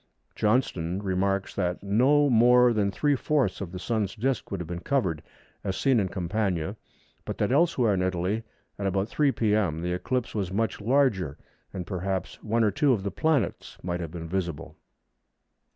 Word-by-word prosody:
Johnston 95 -7 +1
remarks 95 0 0
that 90 -1 -2
no 130 +9 +4
more 125 0 +5
than 105 -2 +1
three 145 +8 +1
fourths 145 -2 0
of 90 -4 -5
the 90 - -6
Sun's 105 0 -2
disc 125 +2 -1
would 100 - -3
have 90 - -4
been 85 +1 -5
covered, 90 - 0 0.4
as 95 -2 -2
seen 135 -4 +3
in 100 - +1
Campania, 95 -1 -1 0.5
but - - -5
that - - 0
elsewhere 135 -7 +3
in 95 - 0
Italy, 95 +4 0 0.4
at 100 - -1
about 95 +2 0
3 145 +1 +2
p.m., 105 -9 +1
the 90 0 -1
eclipse 125 +7 -2
was 95 -4 -2
much 110 +2 -1
larger, 110 - +2 0.3
and 90 -2 -5
perhaps 95 -1 -3
one 115 +2 +1
or 105 - +3
two 145 0 +3
of 100 -5 -2
the 100 - -2
planets 155 - 0
might 90 -1 -2
have 85 -3 -4
been 85 0 -7
visible. 85 -4 -3
100 Hz, 175 wpm, -27 LUFS, 90-120 Hz, 0.5 s, more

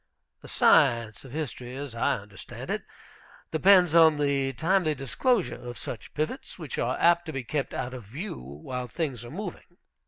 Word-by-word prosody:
The - - -12
science 115 -2 +3
of 135 - -11
history, 130 -4 -5
as 140 -3 -6
I 115 - +1
understand 100 -2 -9
it, - - -1 0.7
depends 180 0 +5
on 160 -2 +7
the 140 -2 +1
timely 165 +1 +2
disclosure 185 - +1
of 120 0 -7
such 115 - -7
pivots, 155 - -3
which 155 -7 -5
are 125 +2 0
apt 175 0 +4
to - - -3
be 135 -3 -4
kept 135 +2 -2
out 125 0 -4
of 125 -4 -8
view 155 - -6
while 75 - -6
things 130 -3 -3
are 120 - -9
moving. 180 0 -7
140 Hz, 175 wpm, -27 LUFS, 120-165 Hz, 0.7 s, on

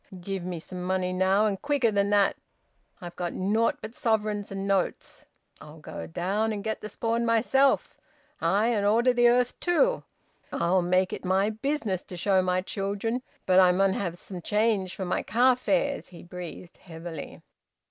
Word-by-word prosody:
Give 190 0 -4
me 175 -2 -4
some 180 +3 -8
money 185 0 -1
now, 190 +3 +3
and 200 -3 -1
quicker 285 -6 +1
than 200 -1 +1
that! 205 -1 +3 0.7
I've 175 -1 -8
got 175 -1 -4
nought 215 +5 +1
but 215 +1 -7
sovereigns 215 -4 -1
and 195 0 -4
notes. 195 -2 -2 0.4
I'll - - -12
go 80 - -8
down 200 - -1
and 205 -2 -4
get 220 0 -3
the 215 - -6
spawn 230 +2 -1
myself 245 +4 +2 0.4
ay! 200 +8 +2
and 215 -4 +1
order 235 +5 +3
the 240 0 +4
earth 245 0 +1
too! - - +2 0.5
I'll 180 +2 +2
make 185 +1 +1
it - - -6
my 190 +3 +2
business 220 -5 -2
to 180 - -9
show 190 +1 +3
my 185 0 0
childer 200 +5 -2 0.3
But 185 0 +5
I 185 -1 +6
mun 190 +1 +2
have 175 -4 -3
some 180 0 -9
change 210 -1 0
for 190 - -4
my 180 - -1
car 245 +4 +3
fares." 280 +2 0
He 175 - -13
breathed 175 0 -9
heavily. 165 -3 -9
200 Hz, 175 wpm, -27 LUFS, 185-225 Hz, 0.7 s, I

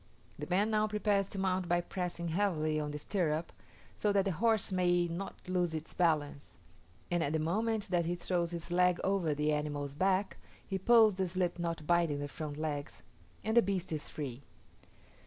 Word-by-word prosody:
The 150 - -5
man 200 +5 +2
now 215 0 +2
prepares 205 -2 +1
to - - -4
mount 185 -2 0
by 175 0 +3
pressing 175 -1 -4
heavily 160 -4 +1
on 150 -1 -2
the 150 - -4
stirrup, 160 0 -1 0.4
so 210 - +1
that 200 -1 +2
the 195 - +1
horse 220 +5 +1
may 175 -1 +2
not 170 +4 -5
lose 180 -3 0
its 155 0 -4
balance; 150 -5 0 0.5
and 175 -1 +2
at 145 - -1
the - - +2
moment 210 +7 0
that 175 -2 +1
he 175 +1 -1
throws 175 -1 -1
his 170 0 -6
leg 180 0 +3
over 185 -6 +1
the 150 +1 +1
animal's 145 -1 -2
back, 190 +5 +1 0.3
he 190 -1 -3
pulls 220 +1 +6
the 190 0 -1
slip 180 0 -1
knot 165 -2 -3
binding 170 -3 +2
the 145 0 -3
front 150 0 -6
legs, 150 -2 -4 0.4
and 220 +1 -1
the 235 - +8
beast 190 -4 -2
is 155 -2 -3
free. 135 -4 -5
175 Hz, 190 wpm, -33 LUFS, 155-195 Hz, 0.5 s, the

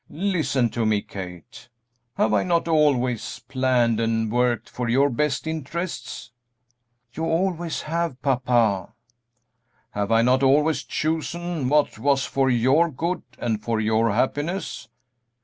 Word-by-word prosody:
Listen 155 - 0
to 120 - -1
me, 110 -2 +1
Kate: 90 +4 -9 0.5
have 110 - +1
I 105 - +3
not 170 -2 0
always 135 -7 +1
planned 125 -4 +1
and 115 -1 0
worked 120 -1 +1
for 125 -1 -4
your 135 +4 +3
best 145 +4 -1
interests?" 160 +1 -5 0.8
"You 160 - -4
always 170 0 -1
have, 165 -4 -2
papa." 120 -6 +1 1.0
"Have 100 +1 -2
I 115 0 +4
not 130 +2 +3
always 150 +4 +3
chosen 160 -1 -2
what 150 -6 +2
was 135 +2 +2
for 135 -1 +1
your 130 +8 +3
good 170 +6 -2 0.2
and 110 -3 -2
for 115 +1 -1
your 110 +1 +2
happiness?" 145 - -2
130 Hz, 130 wpm, -24 LUFS, 115-160 Hz, 1.0 s, I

